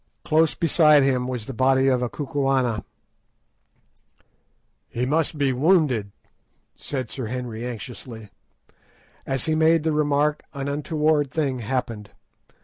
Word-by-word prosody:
Close 160 0 +2
beside 150 -3 +4
him 130 -2 +1
was 125 -4 -4
the 135 - -6
body 130 +2 +3
of 130 -2 +2
a 125 - -1
Kukuana. 135 -5 -1 2.1
"He 120 +2 -2
must 155 +3 0
be 140 -2 +1
wounded," 135 - +2 0.6
said 130 -5 -5
Sir 130 -4 -5
Henry 120 -1 -5
anxiously. 115 -2 -8 1.0
As 135 -2 -1
he 160 - 0
made 160 0 +3
the 160 - +1
remark, 150 0 +1
an 140 0 -4
untoward 150 0 0
thing 135 -3 -1
happened. 115 -3 -3
135 Hz, 125 wpm, -23 LUFS, 125-150 Hz, 2.1 s, beside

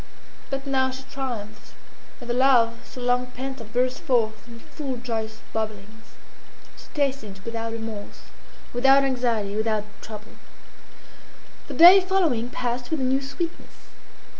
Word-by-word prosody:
But 270 0 -3
now 265 -1 +2
she 260 +1 -7
triumphed, 245 -7 -6 0.4
and 245 - -10
the 240 - 0
love 240 -3 +4
so - - -11
long 245 0 +1
pent 265 +1 -6
up 220 -1 -11
burst 250 +1 +1
forth 225 -3 0
in 235 -1 -11
full 275 0 -6
joyous 225 -2 -4
bubblings. 215 0 -5 0.6
She - - -14
tasted 270 -9 -1
it 190 - -18
without 230 0 -3
remorse, 225 -2 -7 0.5
without 270 +3 +5
anxiety, 235 -6 0
without 215 -1 0 0.2
trouble. 215 0 -9 1.4
The - - -6
day 355 +4 +10
following 340 -11 +1
passed 245 0 -3
with 320 - -1
a - - -1
new 265 +1 +2
sweetness. 325 +5 -6
245 Hz, 140 wpm, -25 LUFS, 225-270 Hz, 1.4 s, day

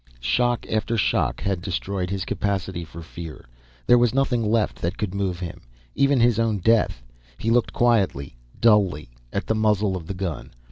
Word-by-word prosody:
Shock 110 - +1
after 110 +1 -1
shock 100 - +1
had 95 -3 -1
destroyed 95 0 -3
his 100 -1 -3
capacity 95 -3 -2
for 85 +1 -10
fear. 80 -1 -9 0.4
There 120 - +6
was 120 0 +2
nothing 135 -4 +1
left 110 0 0
that 85 - -2
could 105 -5 -3
move 95 -3 -2
him, 85 -2 -6 0.3
even 140 -1 +3
his 120 -2 +3
own 115 -2 +1
death. 105 - +2 0.3
He 115 - -1
looked 120 0 +2
quietly 100 - +1 0.2
dully 95 - +3 0.2
at 100 - -2
the - - +1
muzzle 105 -2 +1
of 85 -3 -6
the 100 - -4
gun. 90 -5 -4
100 Hz, 175 wpm, -24 LUFS, 90-115 Hz, 0.4 s, There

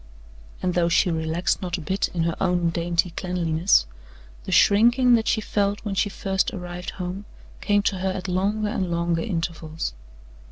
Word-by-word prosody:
And 180 -1 +1
though 170 -1 +2
she 175 +2 +3
relaxed 165 +3 -1
not 180 -1 -2
a - - -7
bit 190 +6 -1
in 170 -2 -2
her 170 0 0
own 175 -3 +1
dainty 170 +1 0
cleanliness, 170 - +1 0.6
the - - -5
shrinking 240 +4 +5
that 225 -1 +3
she 220 - +2
felt 205 0 -1
when 205 - -2
she 200 +1 +1
first 195 -1 -1
arrived 180 -1 -6
home, 185 +2 -5 0.4
came 205 -1 +2
to 195 -2 0
her 190 +1 0
at 185 0 -4
longer 205 +4 0
and 190 -5 -2
longer 170 -1 0
intervals. 165 - -3
180 Hz, 170 wpm, -24 LUFS, 170-200 Hz, 0.6 s, shrinking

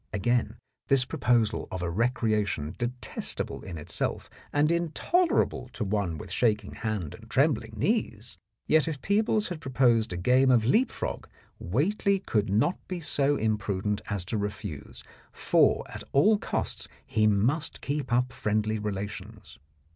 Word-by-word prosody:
Again 115 +2 0 0.3
this 135 -2 +4
proposal 120 -7 +1
of 90 -1 -4
a 85 - -1
recreation 105 - 0
detestable 120 +1 -2
in 85 -3 -7
itself 75 - -2 0.2
and 150 +2 +2
intolerable 170 - +1
to 115 - -3
one 100 -5 -1
with 90 - -9
shaking 105 0 +1
hand 105 -9 -3
and 115 0 -13
trembling 130 -4 +1
knees! 115 - -1 0.3
Yet 155 0 +3
if 155 -4 -3
Peebles 210 0 +1
had 170 -4 -6
proposed 125 -4 +2
a 90 - -3
game 125 +8 +4
of 120 -4 +4
leap 225 - +3
frog - - -5 0.3
Whately 195 - +1
could 110 - -1
not 110 - +2
be 180 -1 -4
so 145 -3 +1
imprudent 105 -2 -1
as 100 -3 -2
to 105 +3 -2
refuse, 85 -8 -6 0.3
for - - +3
at - - -8
all 205 +10 +5
costs - - -2 0.2
he 110 -1 +2
must 125 +11 +1
keep 145 -2 -3
up 125 +1 +1
friendly 110 +1 0
relations. 105 - -6
115 Hz, 145 wpm, -28 LUFS, 105-145 Hz, 0.3 s, all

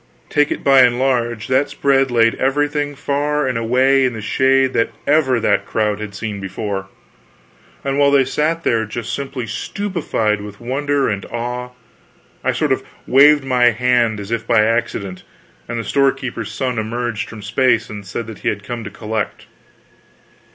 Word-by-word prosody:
Take 150 0 +3
it - - -4
by 135 -1 +6
and 120 -1 +4
large, 120 -4 0
that 130 +2 +2
spread 135 -1 +2
laid 115 -2 +3
everything 145 +1 0
far 145 +1 -1
and 130 - -1
away 130 +4 +3
in 130 -2 +1
the 110 - -6
shade 130 +3 +2
that 115 - +1 0.2
ever 140 -4 +3
that 100 -2 +1
crowd 105 -1 0
had 105 -2 -7
seen 105 -2 -4
before. 95 0 -4 1.0
And 140 0 -1
while 140 0 +5
they 140 -2 +4
sat 160 +5 -1
there 115 -1 +2
just 115 +2 -5
simply 135 -3 -4
stupefied 115 - -2
with 105 -1 -9
wonder 140 +3 0
and 100 -2 -2
awe, 125 +1 -4 0.7
I - - +2
sort - - -1
of - - +1 0.2
waved 145 +2 +6
my 125 -2 +2
hand 120 -2 +2
as 100 +2 -7
if 115 -1 -2
by 110 -2 +4
accident, 110 -5 -2 0.5
and 120 - -4
the 115 - -2
storekeeper's 130 -5 0
son 125 +1 -2
emerged 115 0 -3
from 110 -3 -10
space 130 +5 +2
and 105 -1 -8
said 110 +2 -6
he - - 0
had 105 0 -4
come 120 +1 -5
to 105 - -6
collect. 110 0 -4
120 Hz, 170 wpm, -19 LUFS, 110-135 Hz, 1.0 s, by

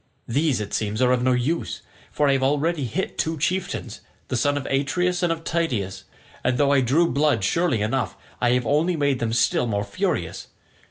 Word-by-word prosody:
These 145 +1 +1
it 105 -1 -5
seems, 105 0 -1
are 125 -1 +4
of 125 -1 +2
no 130 +1 +3
use, 130 +7 -1 0.3
for 150 - +1
I 140 - +4
have 135 - +1
already 145 +2 +1
hit 110 - -3
two 160 0 0
chieftains, 165 - -2 0.3
the - - -1
sons 145 +4 +1
of 140 - -4
Atreus 175 +7 0
and 175 -2 +2
of 165 0 -3
Tydeus, 125 - -2 0.4
and 125 0 +1
though 140 0 +3
I 140 -2 +4
drew 140 +8 +3
blood 140 -6 +2
surely 130 - +1
enough, 125 +4 -1 0.2
I 120 0 +3
have 125 -1 +1
only 160 +7 +2
made 140 -4 +1
them 115 -1 -1
still 120 +1 +2
more 100 -2 -1
furious. 100 - -2
135 Hz, 200 wpm, -23 LUFS, 120-155 Hz, 0.4 s, are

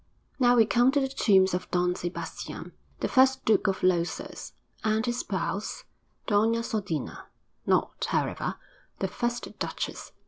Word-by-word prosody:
'Now 245 -1 +5
we 225 -2 +6
come 240 +3 +4
to 285 - +4
the 270 - +1
tombs 190 -8 +3
of 180 - -3
Don 180 0 +2
Sebastian, 175 0 -6 0.3
the - - +1
first 265 0 +4
Duke 215 -1 +3
of 195 -1 -1
Losas, 175 -2 -1 0.3
and 220 0 +1
his 240 0 -1
spouse, 195 +2 -3 0.4
Doña 225 +2 +3
Sodina 190 - -3 0.4
not, - - +1
however, - - -1 0.4
the 195 - -1
first 240 +5 -3
duchess.' - - -4
215 Hz, 140 wpm, -28 LUFS, 185-240 Hz, 0.4 s, we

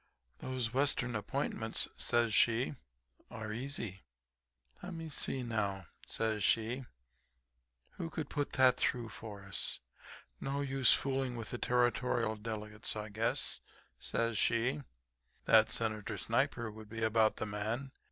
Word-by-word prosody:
"'Those 125 -3 -2
western 130 -3 +2
appointments,' 110 +1 -1
says 120 -2 +2
she, 120 +6 +4 0.6
'are 110 -1 -5
easy. 115 -6 -4 0.8
Le'me 170 -3 -5
see, 135 -3 0
now,' 100 -5 -1 0.2
says 110 -2 0
she, 115 +5 +2 1.1
'who 165 - -5
could 160 -2 -4
put 145 -2 -2
that 130 -1 +6
through 120 -2 0
for 105 -2 -8
us. 95 -1 -1 0.6
No 140 +1 -1
use 135 -2 +4
fooling 135 -2 +1
with 115 -2 -5
the 120 - -3
Territorial 120 -2 +2
delegates. 105 -1 -4
I 105 0 -4
guess,' 110 +2 -1 0.4
says 115 -2 0
she, 125 +5 +2 0.6
'that 110 0 +6
Senator 110 -1 -2
Sniper 120 +1 0
would 110 0 -11
be 115 +1 -4
about 110 0 +4
the - - -3
man. 110 +6 -3
115 Hz, 125 wpm, -34 LUFS, 110-130 Hz, 1.1 s, that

